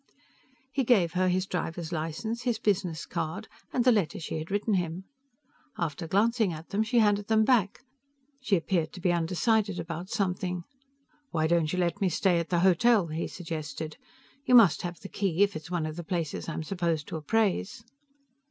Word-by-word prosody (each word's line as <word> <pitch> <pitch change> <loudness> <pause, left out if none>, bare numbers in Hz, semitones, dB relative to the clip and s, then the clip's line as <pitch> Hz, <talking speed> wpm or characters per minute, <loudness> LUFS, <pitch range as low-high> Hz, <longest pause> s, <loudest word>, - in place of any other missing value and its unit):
He 270 - 0
gave 205 -9 +3
her 185 0 +2
his 185 +1 +1
driver's 175 -2 -4
license, 170 +9 -3
his 240 -2 0
business 185 -7 -1
card 165 +4 -4 0.2
and 245 - +1
the 250 - +7
letter 200 -9 +1
she 160 -1 -4
had 155 - -7
written 205 +2 0
him. 175 -1 -1 0.7
After 165 0 -3
glancing 220 +2 +2
at 160 0 -8
them, 205 +1 0
she 220 +2 0
handed 205 -2 +3
them 220 -1 +3
back. 220 -6 +2 0.6
She 215 -6 +2
appeared 165 -2 0
to - - -9
be 180 0 +2
undecided 185 +4 +1
about 170 +2 -5
something. 180 -4 -1 0.7
"Why 160 -1 0
don't 160 -1 +2
you 180 - -2
let 180 +3 0
me 190 - +3
stay 175 +1 +2
at 170 - -4
the 175 -1 +2
hotel?" 190 +1 +4
he 160 +2 -3
suggested. 155 -2 -6 0.5
"You 250 - +4
must 220 -9 +7
have 175 -1 -5
the 195 - -7
key 195 -2 +1
if 200 0 0
it's 155 +1 -7
one 175 -3 -1
of 155 +1 -5
the 175 - -5
places 165 -2 -3
I'm 160 - -3
supposed 170 -3 -1
to - - -5
appraise." 195 - 0
180 Hz, 185 wpm, -28 LUFS, 165-205 Hz, 0.7 s, the